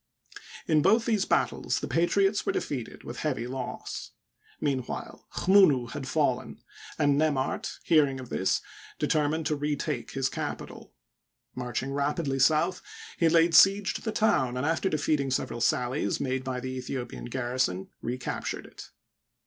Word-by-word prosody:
In 155 -3 +4
both 225 +8 +4
these 215 -5 +1
battles - - 0
the - - -4
patriots 195 +4 +2
were - - 0
defeated 130 -6 -4
with 120 - -7
heavy 130 -6 -1
loss. 130 0 -5 0.5
Meanwhile 135 -4 -3
Chmunu 155 -11 +4
had 135 - -5
fallen, 130 - 0 0.4
and 145 -2 +3
Nemart, 145 -4 0
hearing 145 -5 +3
of 130 - -9
this, 95 - +1 0.4
deter 150 -2 +1
mined 160 +1 -2
to 150 - +1
retake 145 -4 -3
his 135 -1 0
capital. - - -6 0.6
Marching 125 +2 -3
rapidly 140 0 -1
south, 160 +6 +3 0.4
he 165 - +4
laid 165 +1 +4
siege 195 +3 +6
to - - -5
the 220 - -2
town, 130 - +2
and, 130 - -1
after 165 +4 +1
defeating 150 -3 0
several 120 -2 -2
sallies 125 +3 +1
made 130 -1 -1
by 130 -1 -3
the 130 0 -4
Aethiopian 125 -1 -5
garrison, 120 -7 -1
recaptured 125 +2 -4
it. - - -12
140 Hz, 145 wpm, -28 LUFS, 130-160 Hz, 0.6 s, siege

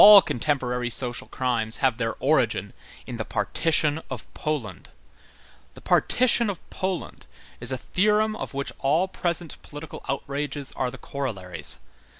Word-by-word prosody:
All 205 -1 +11
contemporary 125 -3 0
social 120 0 0
crimes 115 -4 0
have 130 -3 +1
their 115 -1 -1
origin 130 -8 +2 0.3
in - - -6
the - - -2
partition 155 -1 +2
of 125 -5 -5
Poland. 140 -11 -4 0.9
The - - -12
partition 240 -3 +4
of 190 -4 -6
Poland 185 -1 -4 0.3
is - - +3
a 130 - 0
theorem 210 - +2
of 145 - -6
which 140 0 -2
all 155 +7 +2
present 170 -3 -3
political 150 +2 -9
outrages 140 0 -2
are 125 - -1
the 135 - -9
corollaries. 95 - -4
140 Hz, 140 wpm, -25 LUFS, 125-165 Hz, 0.9 s, All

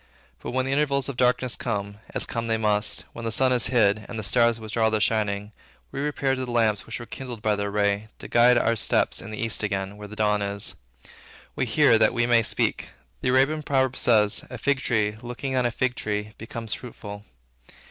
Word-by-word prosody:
But - - -7
when 130 +1 -1
the 135 - -2
intervals 140 -1 +1
of 140 - -5
darkness 125 0 +2
come, 100 -3 -4 0.2
as - - 0
come 115 -1 -4
they 115 0 +1
must, 105 -1 0
when 115 - -8
the 115 - -2
sun 130 +3 +3
is 120 -2 +3
hid, 110 -4 +2
and 120 - -6
the 110 - -4
stars 115 +1 +3
withdraw 110 0 0
their 110 -1 0
shining, 105 -1 0 0.4
we - - -5
repair 140 -2 0
to 130 -1 -2
the 125 - -6
lamps 110 -4 +1
which 115 - -5
were 120 - -8
kindled 120 -3 -8
by 105 -1 +2
their 100 0 -2
ray, 100 +1 0
to - - -9
guide 120 +1 +5
our 115 -1 +2
steps 110 - +1
to - - -5
the 110 0 -7
East 115 -1 -1
again, 100 -1 -3
where 105 0 -9
the 105 - -10
dawn 105 -1 +1
is. 100 0 -1 0.8
We - - -1
hear, 115 - +4
that 110 - +3
we 120 - +2
may 120 -1 +4
speak. 110 - -1 0.3
The - - 0
Arabian 135 +5 +3
proverb 130 -3 +1
says, 105 -5 +4
"A 125 - -7
fig 140 +4 +1
tree, 105 -4 0
looking 125 +2 -4
on 125 -1 +2
a - - -3
fig 130 +2 0
tree, 105 -1 -3
becometh 115 0 -3
fruitful." 105 -4 -8
115 Hz, 220 wpm, -25 LUFS, 105-125 Hz, 0.8 s, guide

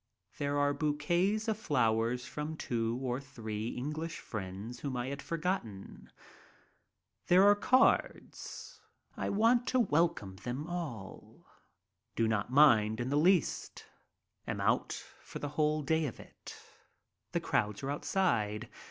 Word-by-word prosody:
There 145 0 0
are 145 0 +2
bouquets 170 +9 0
of 220 -1 0
flowers 120 - +1
from 150 +1 -5
two 115 -3 -1
or 125 0 -1
three 110 -5 -5
English 150 +7 -4
friends 105 +3 -6
whom 135 -3 -3
I 120 +1 -2
had 140 0 -5
forgotten. 155 - -4 1.2
There 180 +2 +6
come 205 - -8
cards. 255 +4 +1 0.3
I - - -2
want 230 +4 +3
to 255 - +2
welcome 165 - +1
them 125 +9 -4
all. 155 - -7 0.7
Do 115 - +2
not 110 +1 -1
mind 110 -7 +5
in 120 +1 -2
the 140 - 0
least. 175 +3 +1 0.6
Am - - -3
out - - +1 0.3
for - - -8
the 145 - -4
whole 150 +1 +1
day 160 +2 +1
of 120 - -8
it. - - -12 0.8
The - - 0
crowds 105 +4 -1
are 135 - -1
outside. 120 - 0
140 Hz, 135 wpm, -32 LUFS, 115-165 Hz, 1.2 s, There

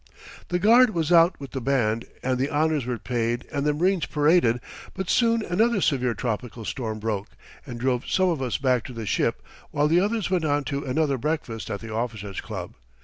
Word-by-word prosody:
The 180 - 0
guard 230 +4 +5
was 165 -1 0
out 170 +1 +5
with 140 -2 -8
the 135 - -4
band, 115 -3 0 0.2
and 130 -1 0
the 135 +2 0
honours 155 -3 +1
were 125 -1 -1
paid 120 +1 -2
and 145 -1 -1
the 150 - +3
marines 180 +2 +1
paraded, 150 -6 +3 0.4
but 190 -1 -2
soon 230 -2 +2
another 215 +5 +2
severe 125 -8 +1
tropical 115 -1 -4
storm 110 -3 -3
broke, 105 -2 -3 0.4
and 120 -2 -6
drove 125 0 0
some 185 -1 +3
of 160 -6 -1
us 125 -3 -1
back 125 -3 +1
to 125 - -8
the 115 -2 -6
ship - - 0 0.3
while 145 +1 +1
the 165 +3 +4
others 210 +1 0
went 180 -3 +1
on 145 -1 +1
to 140 0 -3
another 135 0 0
breakfast 150 -6 -3
at 100 - -4
the 115 -1 -7
Officers' 110 -4 -4
Club. - - -7
140 Hz, 200 wpm, -25 LUFS, 120-170 Hz, 0.4 s, guard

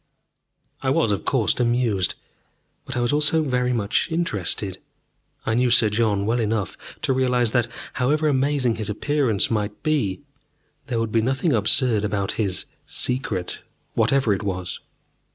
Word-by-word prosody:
I - - 0
was, - - +2
of - - -2
course, - - +1
amused. 120 -6 +1 0.7
But - - -5
I - - +1
was 120 +4 +1
also 150 +2 +3
very 125 -3 0
much 110 -4 +1
interested. 100 - 0 0.7
I 110 - 0
knew 125 +2 +2
Sir 115 -2 +5
John 105 -2 +1
well 115 +3 +1
enough 110 -3 -1 0.3
to 135 - +2
realize 125 -3 +1
that, 120 -2 +2 0.3
however 150 +5 +1
amazing 135 -3 +1
his 110 -1 -3
appearance 120 -1 +1
might 105 -2 -2
be, 135 - 0 0.7
there 120 - -2
would 115 -1 -1
be 115 - +3
nothing 135 +6 +1
absurd 115 0 +3
about 100 -2 -1
his 95 -3 -1 0.2
"Secret" 125 -8 -2 0.3
whatever 135 -6 +2
it 95 - -2
was. 90 -3 -3
120 Hz, 150 wpm, -23 LUFS, 105-130 Hz, 0.7 s, Sir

